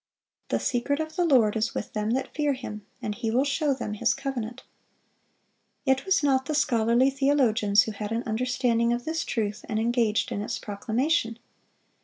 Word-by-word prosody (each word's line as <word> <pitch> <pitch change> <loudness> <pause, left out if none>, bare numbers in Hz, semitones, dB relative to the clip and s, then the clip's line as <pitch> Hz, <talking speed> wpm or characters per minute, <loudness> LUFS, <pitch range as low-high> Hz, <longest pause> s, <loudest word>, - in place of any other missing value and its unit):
"The - - +1
secret 270 +4 0
of 315 0 -4
the 355 -1 +2
Lord 240 -9 +4
is 220 +1 -1
with - - -4
them 210 0 -1
that 265 +1 -2
fear 295 -2 +1
Him; 210 -5 -7 0.2
and 210 - -2
He 225 +1 -3
will 245 +4 +2
show 285 +1 0
them 225 -5 -4
His 230 +3 +1
covenant."(507) 260 -3 -5 1.3
It 265 +1 0
was 380 -5 +3
not 265 -2 +2
the 305 - -1
scholarly 235 +1 +3
theologians 250 -7 +3
who 220 - -4
had 210 0 -5
an 230 +1 -1
understanding 235 0 +1
of 240 0 -3
this 325 +1 -1
truth, 210 -3 -2
and 215 - -1
engaged 230 -2 +1
in 205 - -2
its 210 - -3
proclamation. 225 +4 -1
240 Hz, 180 wpm, -26 LUFS, 220-275 Hz, 1.3 s, Lord